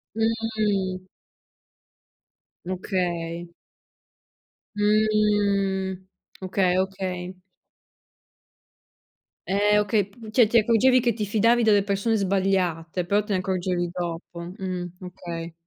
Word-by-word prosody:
Mh. 215 -5 -1 1.6
Okay. 175 -2 -3 1.2
Mh. 205 -2 +2 0.4
Okay, 185 -1 +1
okay. 185 -1 -3 2.1
Eh, 205 +2 +3
okay, 205 -1 +1
p 220 +1 -12
cioè, 235 -1 +5
ti 230 +2 +3
accorgevi 240 +3 +4
che 240 - +2
ti 215 -1 -3
fidavi 230 +3 +3
delle 205 -2 +4
persone 200 +3 0
sbagliate, 185 -4 0
però 205 +3 +2
te 210 - -2
ne 185 - +1
accorgevi 180 -1 -1
dopo. 175 -1 -5 0.2
Mh, 185 -2 -4 0.2
okay. 170 -2 -7
195 Hz, 90 wpm, -25 LUFS, 180-215 Hz, 2.1 s, cioè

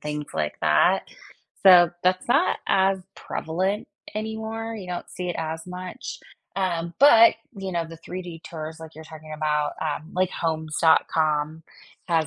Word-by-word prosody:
things 150 0 -4
like 75 -1 -2
that, - - +3 0.5
so 180 -3 +8
that's 185 +3 +1
not 280 +9 +3
as 190 0 +3 0.2
prevalent 185 +6 -2 0.3
anymore, 220 +1 -4
you 195 -4 -8
don't 175 -1 -5
see 180 -1 -5
it - - -4
as 160 +1 -4
much, 180 0 -7 0.4
um, 170 -3 -1
but, 230 -6 +8 0.2
you 190 -1 -5
know, 170 -1 -1
the 165 0 -10
3D 175 -1 -8
tours 160 0 -7
like 160 -1 -10
you're 160 - -10
talking 155 0 -11
about, 150 -1 0
um, 155 +1 -3
like, 185 0 +2
Homes.com 155 -1 +1 0.5
has 165 -2 +2
170 Hz, 145 wpm, -25 LUFS, 155-190 Hz, 0.5 s, so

